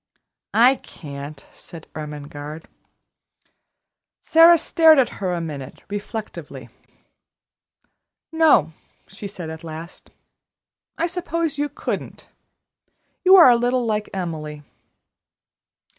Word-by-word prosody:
"I 250 +4 +5
can't," 140 -1 -10
said 165 -2 -12
Ermengarde. 150 0 -8 1.5
Sara 335 +1 +6
stared 320 -1 +5
at 265 - +3
her 185 -2 -1
a 175 - -2
minute 145 -5 -7
reflectively. 210 +1 -7 1.6
"No," 300 - +4 0.3
she 200 +2 -9
said 175 -5 -7
at 160 0 -10
last. 165 +2 -9 0.9
"I 330 - 0
suppose 335 -4 -3
you 290 0 -1
couldn't. 285 - -6 1.0
You 375 0 +7
are 335 -9 +9
a - - +5
little 245 +1 0
like 210 -2 -2
Emily." 155 -5 -5
200 Hz, 100 wpm, -22 LUFS, -, 1.6 s, are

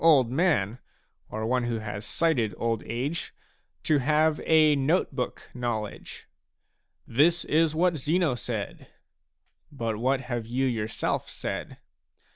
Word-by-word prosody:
old 140 -8 +6
man, 130 - +1 0.5
or 110 +1 -3
one 125 +1 +1
who 120 -1 -1
has 105 -1 -5
sighted 120 -4 +1
old 115 -1 0
age, 135 +8 -3 0.5
to 150 -2 +3
have 155 +3 +2
a 155 -2 +5
note 145 +4 +1
book 125 -2 -4
knowledge. 120 -4 -4 0.4
" - - -49 0.3
This 165 +8 +3
is 155 0 +2
what 170 0 +2
Zeno 155 +1 +1
said." 120 - -5 0.8
But 115 -6 -3
what 130 +3 +1
have 120 -3 -4
you 130 +3 0
yourself 110 -4 -1
said? - - -5
130 Hz, 130 wpm, -27 LUFS, 115-155 Hz, 0.8 s, old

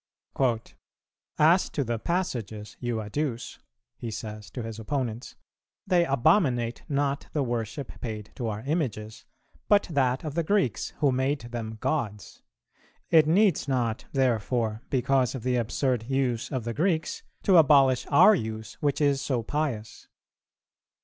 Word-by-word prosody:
"As 165 +5 +4
to 145 - -1
the 120 -2 -2
passages 115 - -3
you 120 -2 -2
adduce," 120 +3 -4 0.4
he 120 - -4
says 105 -1 -7
to 125 - -6
his 115 0 -6
opponents, 120 -1 -3 0.5
"they 180 -3 +3
abominate 135 - +2
not 140 -1 -1
the 150 - +1
worship 120 +1 -4
paid 110 -3 -6
to 120 - -4
our 105 -1 -3
Images, 115 - -3 0.4
but 205 -1 +5
that 130 -3 +1
of 155 -3 -4
the 170 - +1
Greeks, 180 - 0
who 145 -3 +4
made 130 +3 0
them 115 -2 -6
gods. 105 -10 -3 0.7
It 160 -2 +6
needs 185 -1 +3
not 120 -4 -1
therefore, 115 -3 0
because 130 0 +1
of 125 - -6
the 125 -1 +1
absurd 120 0 -1
use 130 -4 0
of 130 -4 -2
the 115 +1 -3
Greeks, 160 - 0 0.2
to 190 -3 +5
abolish 135 -5 +5
our 155 +9 +7
use 110 - -4
which 145 0 0
is 140 -2 +2
so 125 -4 -1
pious. 130 -5 -3
130 Hz, 140 wpm, -27 LUFS, 115-150 Hz, 0.7 s, our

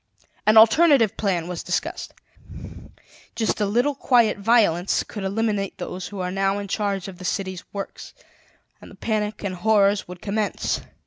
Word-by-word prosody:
"An 215 +1 +6
alternative 230 - +6
plan 180 -5 -1
was 180 -1 -5
discussed: - - -4 1.2
just 220 -1 -1
a 205 - +2
little 245 +8 +1
quiet 240 -6 +2
violence 200 -5 +2
could 205 - -8
eliminate 200 0 -1
those 180 0 -6
who 205 - -8
are 180 0 -3
now 195 +1 0
in 200 0 -5
charge 200 -1 -2
of 185 -2 -10
the - - -9
city's 190 -1 -3
works, 200 -1 -7 0.7
and - - -12
the - - -14
panic 215 -1 -2
and 200 -2 -2
horrors 200 +1 +2
would 180 0 -9
commence. 210 +1 -2
200 Hz, 155 wpm, -23 LUFS, 190-220 Hz, 1.2 s, An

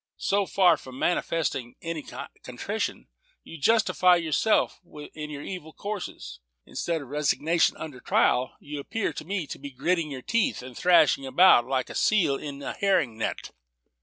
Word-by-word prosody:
So 200 -1 0
far 190 -2 +4
from 130 -1 -11
manifesting 150 -7 -1
any 165 -2 -4 0.4
contrition, - - -4 0.4
you 165 - -11
justify 185 0 +4
yourself 170 +6 +1
in 150 -1 -9
your 145 -1 -7
evil 175 -5 -7
courses. 195 - -6 0.3
Instead 165 -3 -3
of 130 - -14
resignation 150 +3 +1
under 150 -5 -7
trial, 125 +1 +1
you 145 0 -7
appear 200 +3 -2
to - - -6
me 190 -2 -2
to - - -8
be 140 +1 -7
'gritting 155 +5 -1
your 130 -3 -7
teeth,' 230 - 0
and 125 -1 -10
thrashing 155 -5 +4
about 130 -3 +6
like 130 -1 0
unto - - -11
a - - -8
seal 195 -10 +3
in 140 0 -7
a - - -4
herring 180 - +1
net." 110 - -4
155 Hz, 165 wpm, -26 LUFS, 135-180 Hz, 0.4 s, about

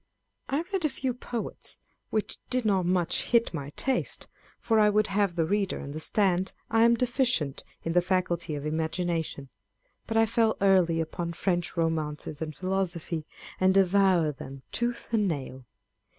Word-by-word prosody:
I 285 +4 0
read 380 -3 0
a 305 - +3
few 260 -2 -2
poets, 240 -1 -6 0.3
which 215 - -2
did 250 -2 0
not 190 -4 +2
much 180 -2 +1
hit 235 -4 +2
my 140 -4 -4
taste, 265 -2 -1
â€" - - -41 0.2
for 225 -2 +2
I 210 0 +6
would 210 +1 +3
have 200 -3 +1
the 165 -2 +2
reader 200 +2 0
understand, 180 +5 0 0.2
I 225 0 +4
am 235 +1 +6
deficient 240 - 0 0.2
in 165 - -1
the 175 - +5
faculty 175 -3 0
of 145 0 -5
imagination; 160 -2 -2 0.6
but 225 - 0
I 225 - +6
fell 225 0 +2
early 185 -4 +4
upon 170 +1 -4
French 175 0 -1
romances 155 -2 -2
and 155 -1 -4
philosophy, 175 -3 -2 0.3
and 190 0 +4
devoured 185 -6 +4
them 135 0 -9
tooth 240 0 -2
and 215 -3 +2
nail. 130 -6 -4
185 Hz, 160 wpm, -28 LUFS, 160-220 Hz, 0.6 s, I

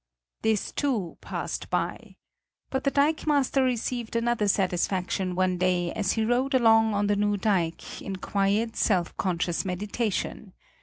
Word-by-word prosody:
This, 220 -2 0
too, 230 - -2
passed - - -4
by. - - -3 0.6
But 265 - -2
the - - +5
dikemaster 285 -2 +2
received 240 -2 -2
another 230 -2 +1
satisfaction 185 -1 0
one 185 -1 +1
day 180 -1 +1
as 210 -3 0
he 220 -1 0
rode 255 +4 +1
along 225 -3 +5
on 205 0 +1
the 205 0 +2
new 205 0 +1
dike, 185 -5 -1
in 195 - -4
quiet, 200 +4 0
self 180 -5 +1
conscious 175 -2 -1
meditation. 200 +1 -3
205 Hz, 140 wpm, -27 LUFS, 185-235 Hz, 0.6 s, the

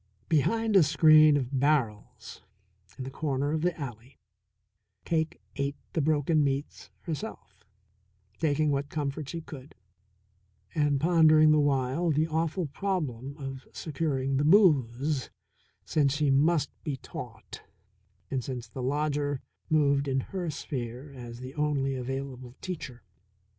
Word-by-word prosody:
Behind 220 +8 +2
a 190 - +8
screen 155 0 +6
of 135 0 -2
barrels 130 -7 -1 0.6
in 130 - -5
the 130 - -6
corner 140 -1 -1
of 155 0 0
the 175 -1 0
alley 125 -2 -8 0.9
Cake 160 -1 -1 0.2
ate 140 +1 -1 0.2
the 165 - +1
broken 155 +1 +2
meats 140 +1 -3
herself, 160 -4 -7 0.8
taking 155 -1 +2
what 140 0 -1
comfort 145 -1 -3
she 170 - -4
could, 145 -3 -11 1.0
and 145 -3 +2
pondering 155 -1 +6
the 155 - +5
while 140 +3 +1
the 155 +1 +2
awful 165 +2 -1
problem 140 -6 -3
of 135 -2 -7
securing 135 -3 -1
the 145 - +1
booze, 145 - +3 0.6
since 145 -3 +2
she 145 -2 +2
must 150 +2 +3
be 145 -5 -3
taught, 115 -4 -9 0.7
and 130 -2 -1
since 125 -2 -5
the 130 - -7
lodger 145 +1 0 0.3
moved 140 -2 +3
in 135 -1 +1
her 180 +3 -4
sphere 130 -2 -5
as 120 -2 -9
the 130 +1 -7
only 145 -2 0
available 130 -1 -5
teacher. 140 - -6
145 Hz, 130 wpm, -28 LUFS, 135-155 Hz, 1.0 s, a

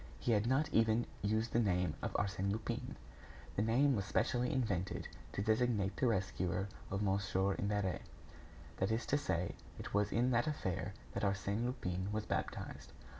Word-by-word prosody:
He 120 - 0
had 110 0 +3
not 135 +4 +3
even 115 +1 +4 0.2
used 110 +3 0
the 115 - +4
name 90 -5 +2
of - - -1
Arsène 100 -1 0
Lupin. 110 +1 -3 0.6
The - - +1
name 130 +6 +4
was 100 - 0
specially 125 +3 +1
invented 100 -8 -1 0.3
to 100 - -1
designate 110 -3 +2
the 130 - +3
rescuer 95 -2 0 0.2
of 95 +2 -1
Mon. 100 0 +2 0.4
Imbert; 100 -2 0 0.8
that 95 - +1
is 115 +1 0
to 145 - +2
say, 90 -11 -1 0.2
it - - -7
was 105 0 +2
in 125 +2 +3
that 120 +2 +3
affair 100 - -2 0.2
that - - -2
Arsène 100 +2 0
Lupin 95 -6 -2
was 105 0 -1
baptized. - - -3
105 Hz, 165 wpm, -36 LUFS, 95-120 Hz, 0.8 s, even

